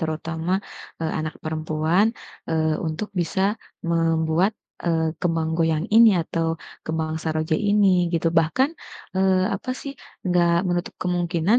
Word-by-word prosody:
terutama, 160 +1 -2 0.5
eee, 160 -1 -1
anak 155 0 -3
perempuan, 155 +5 +1 0.4
eee, 160 -1 +1
untuk 160 +7 -3
bisa 175 +3 -1 0.5
membuat, 165 +3 +2 0.3
eee, 160 -1 +1
kembang 165 -2 0
goyang 160 0 +2
ini 230 0 +9
atau 165 0 -2 0.4
kembang 160 0 -2
saroja 155 0 0
ini, 205 -1 +3 0.2
gitu. 165 0 0
Bahkan, 165 - +2 0.5
eee, 190 -1 +3
apa 255 - -6
sih, 280 - -6 0.4
nggak 175 -1 +3 0.2
menutup 175 0 -2
kemungkinan 175 +3 +2
165 Hz, 125 wpm, -23 LUFS, 160-180 Hz, 0.5 s, ini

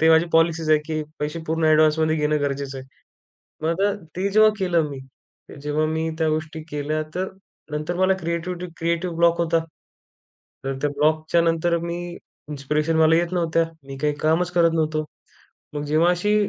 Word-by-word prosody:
ते 160 - +5
माझी 160 +1 +6
पॉलिसीच 165 -1 +2
आहे, 155 - +6
की 155 -1 -2 0.2
पैसे 150 +2 -2
पूर्ण 160 +1 0
ॲडव्हान्समध्ये 155 0 +4
घेणं 150 -1 +1
गरजेचं 140 -1 -3
आहे. 130 - -10 0.8
मग 170 +4 0
अ, 205 - +2 0.2
ते 190 +2 0
जेव्हा 215 +1 +6
केलं 170 -5 +1
मी, 140 -2 -7 0.6
जेव्हा 150 +1 0
मी 160 +1 -1
त्या 160 -1 +2
गोष्टी 155 +1 -3
केल्या, 150 +1 -1
तर 185 +1 -1 0.4
नंतर 155 +4 -3
मला 185 +1 +3
क्रिएटिव्हिटी 170 +2 -3
क्रिएटिव्ह 170 +1 -1
ब्लॉक 170 0 +4
होता. 165 0 +2 1.1
तर 135 - -1
त्या 145 - +1
ब्लॉकच्या 155 +3 +2
नंतर 170 +1 +1
मी 170 0 -3 0.5
इन्स्पिरेशन 150 +2 -1
मला 160 0 +5
येत 170 +1 +1
नव्हत्या. 165 -2 +2 0.2
मी 135 - -7
काही 150 -1 +2
कामच 165 +3 +2
करत 170 -1 +4
नव्हतो. 155 -1 0 0.7
मग 145 -1 -3
जेव्हा 155 +4 +3
अशी 205 +4 +1
160 Hz, 165 wpm, -23 LUFS, 155-170 Hz, 1.1 s, माझी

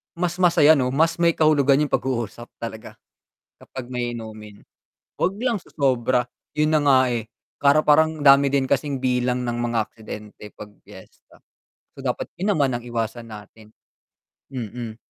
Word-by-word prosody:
Mas 175 0 -2
masaya 160 -3 +6
'no, 125 -3 0
mas 160 +5 +2
may 170 0 +3
kahulugan 145 -3 +3
yung - - -20
pag-uusap 120 -2 -3
talaga 115 -1 -8 0.6
kapag 130 -2 -10
may 120 -1 -3
inumin, 110 -2 -10 0.6
'wag 185 - 0
lang 245 -1 0
sosobra. 125 -3 0 0.2
Yun 155 +1 +1
na 155 - +4
nga, 135 -2 +5
eh, 120 -3 -2 0.3
para 145 +2 +4
parang 160 +1 +4
dami 140 -1 +5
din 135 -2 +1
kasing 140 -1 -1
bilang 125 -1 0
ng 120 0 -2
mga 120 -1 0
aksidente 105 -1 -10
'pag 105 - -11 0.2
fiesta, - - -17 0.5
so, - - -17
dapat - - -3
yun 200 +2 +1
naman 140 -3 +2
ang - - -15
iwasan 115 0 -4
natin, 110 0 -13 0.7
mm. 120 -3 -6
130 Hz, 150 wpm, -22 LUFS, 115-145 Hz, 0.7 s, masaya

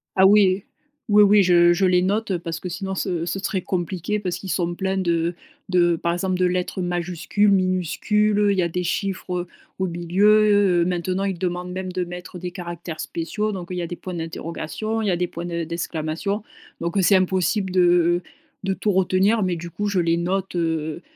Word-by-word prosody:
Ah 190 - +6
oui, 195 -1 +5 0.5
oui, 210 0 +7
oui 205 0 +6
je 175 -1 +5
je 185 +2 +1
les 180 -1 +4
note, 205 +3 0
heu, 175 - 0
parce 165 -1 -5
que 180 - -6
sinon 190 +2 -4
ce 175 -3 -2
ce 180 +3 -2
serait 195 -1 -2
compliqué 185 +3 -2
parce 180 -3 -3
qu'ils 190 +1 -8
sont 175 -1 0
pleins 190 +1 -1
de 170 -2 0 0.3
de 175 -2 +3
par 170 +1 -1
exemple, 185 +1 -1
de 185 - +2
lettres 180 +1 -1
majuscules, 175 +3 0
minuscules, 185 +3 +1
heu, 205 -1 +3
il 200 - 0
y - - +3
a 170 - 0
des 180 +2 -2
chiffres 180 -1 -2 0.3
au 190 - 0
milieu. 200 +2 +3
Heu, - - +2
maintenant 185 +2 -1
ils 195 -2 -2
demandent 180 0 -3
même 185 0 -4
de 180 0 -1
mettre 180 +1 -8
des 180 0 -5
caractères 170 -2 -7
spéciaux, 190 +6 -3
donc 185 -3 -6
il 180 - -3
y 175 - -1
a 170 - -3
des 175 - -5
points 185 +1 -7
d'interrogation, 165 +6 -4
il 215 - -1
y - - +2
a 175 - +1
des 180 - 0
points 170 0 -7
de 170 -1 -3
d'exclamation. 170 +4 -3 0.4
Donc, 170 +3 -2
heu, - - +4
c'est 195 +2 +5
impossible 190 +1 +1
de 175 -1 +3 0.4
de 195 - 0
tout 205 +2 0
retenir. 190 +3 +2
Mais 185 -2 0
du 170 +1 -7
coup 205 +4 -3
je 200 -2 +1
les 170 -1 +2
note, 185 +2 -2
heu, 160 -1 -1
180 Hz, 215 wpm, -23 LUFS, 175-195 Hz, 0.5 s, oui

